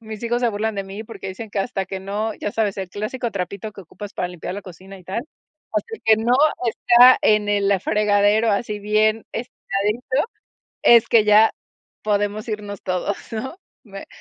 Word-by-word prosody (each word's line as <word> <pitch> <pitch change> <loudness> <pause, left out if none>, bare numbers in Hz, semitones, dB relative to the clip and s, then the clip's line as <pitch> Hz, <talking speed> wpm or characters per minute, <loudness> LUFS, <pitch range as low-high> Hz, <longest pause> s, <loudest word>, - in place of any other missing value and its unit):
mis 220 0 -8
hijos 240 +1 -1
se 240 - +3
burlan 220 +1 -2
de 195 -1 -3
mí 200 +3 -8
porque 210 -3 -8
dicen 210 +3 -7
que: 205 - -3
“Hasta 195 -3 -3
que 190 0 -5
no”. 210 +3 -3
Ya 205 - -3
sabes, 210 -3 0
el 190 -2 -5
clásico 230 +5 -3
trapito 200 +2 -5
que 200 - -11
ocupas 200 +4 -10
para 180 - -2
limpiar 180 0 -6
la 205 - -5
cocina 190 +1 -12
y 180 - -17
tal: 190 +6 -3 0.5
"Hasta 455 -1 -2
que 220 0 +6
no 235 +2 +1 0.3
está 245 +3 +6
en 210 -1 +3
el 200 -1 +2
fregadero 210 +1 +3
así 210 0 -2
bien 215 +1 +1
estiradito, 240 - -2 0.5
es 235 -1 +6
que 220 -2 +5
ya 215 +1 +6 0.5
podemos 205 +1 -1
irnos 205 -2 -5
todos, 185 +2 -2 0.2
¿no?". 260 +9 -5 0.3
Me 195 -2 -10
210 Hz, 180 wpm, -21 LUFS, 200-225 Hz, 0.5 s, que